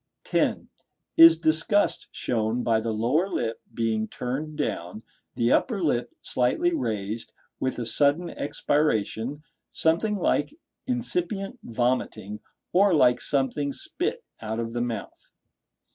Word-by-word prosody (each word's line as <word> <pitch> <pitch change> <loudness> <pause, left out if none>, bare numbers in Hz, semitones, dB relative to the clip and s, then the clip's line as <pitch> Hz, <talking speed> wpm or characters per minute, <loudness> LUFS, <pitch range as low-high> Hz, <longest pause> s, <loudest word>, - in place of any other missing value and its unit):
(10) - - 0 0.5
Is 165 0 +9
disgust 165 +6 +2
shown 115 +1 -1
by 115 -2 +2
the 115 0 -2
lower 125 - +1
lip 115 -9 -2
being 110 -1 -1
turned 150 +5 -4
down, 90 +6 -3 0.3
the 115 0 +2
upper 225 -6 +2
lip 125 -8 0
slightly 325 - +1
raised, 110 - -3 0.3
with 130 - -1
a 120 - -3
sudden 145 +8 +2
expiration, 145 -2 -1 0.3
something 170 +7 +1
like 205 +9 0 0.3
incipient 245 - -2
vomiting, 115 -3 -2 0.3
or 195 -1 +5
like 125 -4 +4
something 140 +1 0
spit - - -3 0.2
out 110 +1 -3
of 115 0 -3
the 120 - -1
mouth? 115 -4 -5
125 Hz, 120 wpm, -26 LUFS, 115-165 Hz, 0.5 s, Is